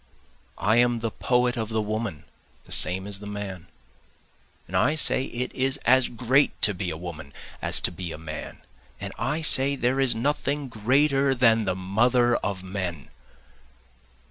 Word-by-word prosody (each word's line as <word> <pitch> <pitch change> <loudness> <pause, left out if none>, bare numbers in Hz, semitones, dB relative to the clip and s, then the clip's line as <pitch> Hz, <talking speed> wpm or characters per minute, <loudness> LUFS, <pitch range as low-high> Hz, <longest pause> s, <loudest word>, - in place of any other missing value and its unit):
I 110 +3 +2
am 120 -1 +3
the 115 -1 -2
poet 125 +1 +1
of 110 -2 -3
the 110 -1 -1
woman 110 -6 -3 0.4
the - - -16
same 95 +1 +1
as 100 -1 -3
the 105 - -9
man, 100 -4 -6 1.0
And 90 - -7
I 130 +11 +3
say 135 -3 +3
it 125 0 -4
is 135 0 0
as 130 +1 +4
great 125 +4 +1
to 100 - +6
be 90 -1 -4
a 80 - -5
woman 80 -4 -8 0.3
as - - +1
to - - 0
be 85 -1 -6
a - - -7
man, 75 -1 -8 0.4
And - - -6
I 155 +4 -1
say 140 -1 +3
there 130 0 0
is 130 -4 +3
nothing 140 +3 -1
greater 135 +4 +2
than 115 -3 +4
the 95 -2 0
mother 120 +6 +2
of 95 -2 -4
men. 90 -5 -5
115 Hz, 170 wpm, -25 LUFS, 95-130 Hz, 1.0 s, to